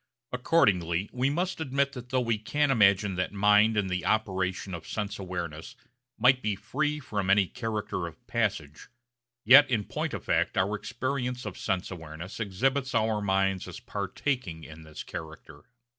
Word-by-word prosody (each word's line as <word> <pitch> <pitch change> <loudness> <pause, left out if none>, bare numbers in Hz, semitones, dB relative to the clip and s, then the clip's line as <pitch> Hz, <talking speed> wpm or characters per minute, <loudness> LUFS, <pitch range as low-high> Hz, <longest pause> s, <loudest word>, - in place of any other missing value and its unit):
Accordingly 100 - +2
we 130 +2 +1
must 175 +3 -2
admit 140 -1 0
that 125 -2 -9
though 130 0 +1
we 115 -3 0
can 145 +6 +1
imagine 100 -4 +4
that 90 - -1
mind 105 +2 +4
in 105 - +2
the 90 -1 -2
operation 95 -3 -1
of 85 - -7
sense 105 0 -4
awareness 85 -4 -5 0.4
might 130 0 +4
be 105 -3 -1
free 150 +8 -2
from 100 -8 -3
any 100 0 +5
character 110 -5 -3
of 85 +9 -13
passage, 95 -12 -2 0.6
yet 135 +5 +9
in 115 -5 +1
point - - -3
of - - -6
fact - - +1
our 95 +3 +2
experience 125 +2 -3
of - - -5
sense 95 -2 -2
awareness 80 +3 -8
exhibits 130 +6 0
our 110 -1 +1
minds 95 -1 +1
as - - -8
partaking 100 - -3
in 80 +1 -11
this 80 -1 -9
character. 80 +5 -9
105 Hz, 160 wpm, -28 LUFS, 95-125 Hz, 0.6 s, yet